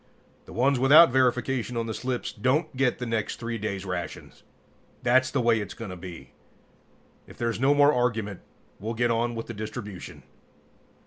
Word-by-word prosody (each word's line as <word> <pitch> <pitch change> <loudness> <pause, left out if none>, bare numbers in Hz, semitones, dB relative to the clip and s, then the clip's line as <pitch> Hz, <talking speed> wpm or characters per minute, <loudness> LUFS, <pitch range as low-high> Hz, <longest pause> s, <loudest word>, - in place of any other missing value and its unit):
The - - -13
ones 130 +5 +2
without 140 +3 +8
verification 125 -1 +1
on 115 - -1
the 110 - -4
slips 125 +1 -3
don't 130 +8 0
get 130 -1 +1
the 125 - -4
next 115 -2 -2
3 115 -1 -5
days' 100 -2 -4
rations. 90 -2 -6 0.6
That's 130 +1 +4
the 135 -1 0
way 115 -1 +3
it's 100 -2 -6
going 115 -5 -7
to - - -6
be. 85 -7 -10 1.0
If - - -14
there's 115 -2 -2
no 135 +3 +4
more 145 +1 +5
argument, 115 -6 -1 0.4
we'll 110 +3 -4
get 120 +1 +1
on 120 +1 0
with 115 - -4
the 115 - -7
distribution. 105 -2 -7
120 Hz, 175 wpm, -26 LUFS, 110-130 Hz, 1.0 s, without